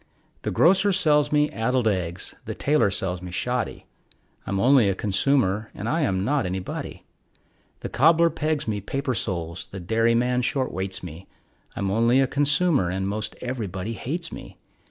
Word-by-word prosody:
The - - -3
grocer 195 +4 +4
sells 150 -6 +3
me 150 0 +2
addled 120 +1 0
eggs; 90 -3 -2
the - - -5
tailor 145 -7 +2
sells 95 -2 -2
me 90 - -7
shoddy, 125 +7 -2 0.6
I'm 100 - -1
only 125 -2 +5
a 95 - 0
consumer, 105 0 +1
and 105 - -5
I 160 +7 +1
am 95 -8 0
not 140 -5 +1
anybody. 90 0 -5 0.8
The - - -5
cobbler 165 +5 +4
pegs 155 -2 -2
me 105 -2 -2
paper 135 +5 -2
soles, 85 -6 -3
the 95 - -8
dairyman 115 +6 +1
short 130 +1 -1
weights 95 0 -4
me, 90 +2 -9 0.5
I'm 95 -1 -1
only 115 +5 +3
a 135 - +4
consumer, 145 - +2
and 95 +1 -2
most 105 +2 -3
everybody 110 -5 -4
hates 165 +9 -4
me. - - -10
115 Hz, 160 wpm, -24 LUFS, 95-145 Hz, 0.8 s, only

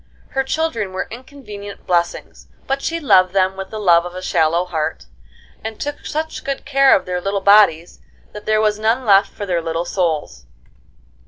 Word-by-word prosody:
Her 270 - -1
children 265 -9 -2
were 185 - -3
inconvenient 225 -5 -10
blessings, 175 -1 -2 0.2
but 270 +1 -2
she 330 +3 -2
loved 185 - +4
them 190 -1 +2
with 190 0 -7
the 220 - -7
love 170 -4 +4
of 175 0 -8
a 185 - -6
shallow 165 +2 +1
heart, 160 - -3 0.6
and 220 -1 -6
took 290 0 -5
such 315 +1 -4
good 275 -1 -4
care 275 -1 +5
of 190 - -1
their 180 -1 -3
little 195 +2 -1
bodies 195 -4 +4 0.3
that 210 - -11
there 215 0 +3
was 215 -1 +1
none 230 +4 +1
left 200 -1 +4
for 205 - -6
their 175 -3 -1
little 165 +1 -3
souls. 155 - -2
200 Hz, 180 wpm, -19 LUFS, 180-240 Hz, 0.6 s, care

